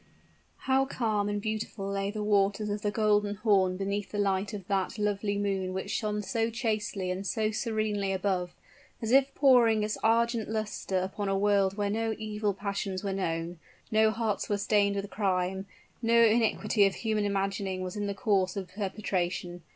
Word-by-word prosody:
How 265 0 +3
calm 215 -6 -1
and 205 0 -1
beautiful 215 -1 -4
lay 200 0 -1
the 210 0 -4
waters 205 0 +2
of 205 0 -3
the 205 - 0
Golden 210 -1 +2
Horn 195 -4 +2
beneath 200 +1 -2
the 210 - -4
light 200 0 0
of 200 -4 -7
that 195 +1 -1
lovely 205 -1 0
moon 195 -2 -1
which 190 +2 -4
shone 210 -2 -1
so 225 +2 0
chastely 215 -5 -2
and 185 +2 -3
so 215 0 0
serenely 215 -3 -1
above, 185 -2 -1 0.4
as 225 0 -3
if 270 +1 +4
pouring 235 -6 +5
its 210 0 -2
argent 230 0 +2
luster 215 -3 -2
upon 190 +2 -2
a 195 - +1
world 200 -1 +2
where 205 -1 0
no 225 +1 -1
evil 210 -1 -2
passions 200 -1 -3
were 195 -1 -1
known 170 -2 -3 0.3
no 220 0 +4
hearts 220 -1 -2
were 205 - +1
stained 200 0 +2
with 200 0 -3
crime 190 -1 -1 0.3
no 235 0 +4
iniquity 220 -2 +4
of 195 - -3
human 215 -2 -1
imagining 195 -1 -1
was 185 +1 -5
in 205 -1 -2
the 200 - -3
course 195 -3 +1
of 190 -3 -4
perpetration. 185 -3 -3
205 Hz, 175 wpm, -29 LUFS, 195-215 Hz, 0.4 s, pouring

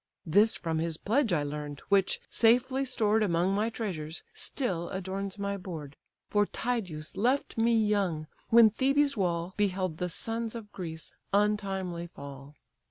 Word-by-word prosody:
(This 205 +7 +4
from 160 -1 -2
his 165 -1 -1
pledge 230 +4 +1
I 155 -4 +2
learn'd, 145 0 -5
which, 195 -1 +3
safely 250 +4 +3
stored 220 -4 +1
Among 180 -1 +2
my 210 +3 +1
treasures, 175 -9 -5
still 180 -11 -2
adorns 190 +1 -4
my 200 0 -2
board: 160 -7 -7 0.3
For 205 -1 +2
Tydeus 190 -11 -3
left 255 +7 +1
me 230 0 +3
young, 200 -8 +1 0.2
when 225 -1 +8
Thebe's 275 +5 +2
wall 175 -3 -1
Beheld 185 -5 0
the 180 - -1
sons 225 +5 -3
of 215 -3 -8
Greece 160 -3 -7 0.2
untimely 195 -4 0
fall.) 140 -2 -10
195 Hz, 145 wpm, -30 LUFS, 170-225 Hz, 0.3 s, when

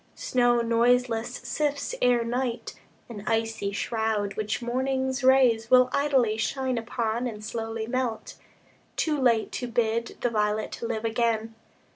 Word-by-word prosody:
Snow 245 -1 +2
noiseless 235 0 +2
sifts 295 - -2
Ere 245 -1 +3
night, 245 0 -3 0.3
an 210 -4 -8
icy 225 -2 -1
shroud, 215 -1 -1
which 215 0 -2
morning's 260 +2 -1
rays 250 -4 +4
Will 255 0 +6
idly 265 -7 +2
shine 255 +2 -1
upon 230 +1 -2
and 215 -2 -7
slowly 225 0 -4
melt, 240 -2 -3 0.6
Too 300 -3 0
late 230 -4 +2
to 245 - -4
bid 230 0 -1
the 245 - +1
violet 210 0 -1
live 230 -1 -3
again. 225 -1 0
235 Hz, 130 wpm, -26 LUFS, 225-255 Hz, 0.6 s, Will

